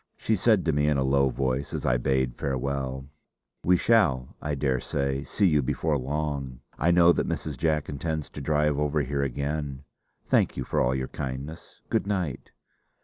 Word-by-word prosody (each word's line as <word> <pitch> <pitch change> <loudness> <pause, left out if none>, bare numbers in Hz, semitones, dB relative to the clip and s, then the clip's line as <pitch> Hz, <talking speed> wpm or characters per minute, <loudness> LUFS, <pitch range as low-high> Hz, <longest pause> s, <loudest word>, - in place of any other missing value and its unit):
She 110 - +1
said 105 0 +3
to 80 - +3
me, 75 +1 +2
in 75 -2 +2
a 65 - +1
low 70 0 +3
voice, 65 +1 -2
as - - -4
I - - +3
bade 65 -1 0
farewell: 65 0 -2 0.6
"We 90 +1 +4
shall, 80 - +2
I 75 -1 -2
daresay, 70 0 -1
see 100 - 0
you 75 -5 +4
before 75 +4 0
long. 70 -2 -3 0.2
I 85 - +2
know 85 0 +6
that - - 0
Mrs. 75 -3 -3
Jack 75 +2 0
intends 80 +1 -3
to - - -7
drive 75 0 +1
over 75 0 +1
here 70 +1 -1
again. 70 +1 -3 0.4
Thank - - +2
you - - -1
for - - 0
all 65 +1 +2
your 65 0 -2
kindness. 70 +4 -7
Good - - 0
night!" 90 -10 -2
70 Hz, 180 wpm, -27 LUFS, 65-75 Hz, 0.6 s, know